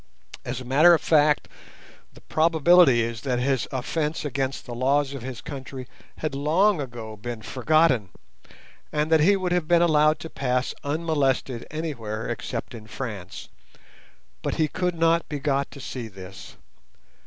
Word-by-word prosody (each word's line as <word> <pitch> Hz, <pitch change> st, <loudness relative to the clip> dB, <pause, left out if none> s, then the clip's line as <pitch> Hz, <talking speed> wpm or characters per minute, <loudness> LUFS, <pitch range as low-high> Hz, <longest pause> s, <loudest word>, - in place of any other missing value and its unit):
As 120 Hz, 0 st, -4 dB
a 130 Hz, -, -9 dB
matter 155 Hz, +7 st, +6 dB
of -, -, -3 dB
fact, 150 Hz, -2 st, +3 dB, 0.7 s
the -, -, -16 dB
probability 160 Hz, -4 st, +4 dB
is 115 Hz, -1 st, -4 dB
that 125 Hz, -3 st, -1 dB
his 130 Hz, +1 st, 0 dB
offence 150 Hz, +4 st, -2 dB
against 135 Hz, -1 st, -2 dB
the 120 Hz, -, -7 dB
laws 135 Hz, +3 st, +1 dB
of 135 Hz, -, -6 dB
his 125 Hz, -1 st, -7 dB
country 130 Hz, -2 st, -8 dB, 0.3 s
had 155 Hz, -2 st, -3 dB
long 160 Hz, +6 st, +2 dB
ago 115 Hz, -4 st, -7 dB
been 110 Hz, +1 st, -7 dB
forgotten, 130 Hz, -, +2 dB, 0.8 s
and 150 Hz, +1 st, -1 dB
that 160 Hz, -, +6 dB
he 190 Hz, +7 st, +5 dB
would 185 Hz, -2 st, -2 dB
have 175 Hz, -3 st, 0 dB
been 170 Hz, 0 st, +4 dB
allowed 155 Hz, -2 st, +4 dB
to 165 Hz, -, -7 dB
pass 125 Hz, -1 st, -1 dB
unmolested 145 Hz, -5 st, -1 dB
anywhere 120 Hz, -9 st, -4 dB
except -, -, -5 dB
in 110 Hz, -2 st, -10 dB
France; 105 Hz, -7 st, -7 dB, 0.9 s
but -, -, -2 dB
he 155 Hz, -, +2 dB
could 180 Hz, +3 st, -2 dB
not 165 Hz, 0 st, +2 dB
be 150 Hz, -, -3 dB
got 140 Hz, -1 st, 0 dB
to 140 Hz, -, -12 dB
see 125 Hz, -3 st, -6 dB
this. 95 Hz, -2 st, -11 dB
140 Hz, 155 wpm, -25 LUFS, 125-160 Hz, 0.9 s, matter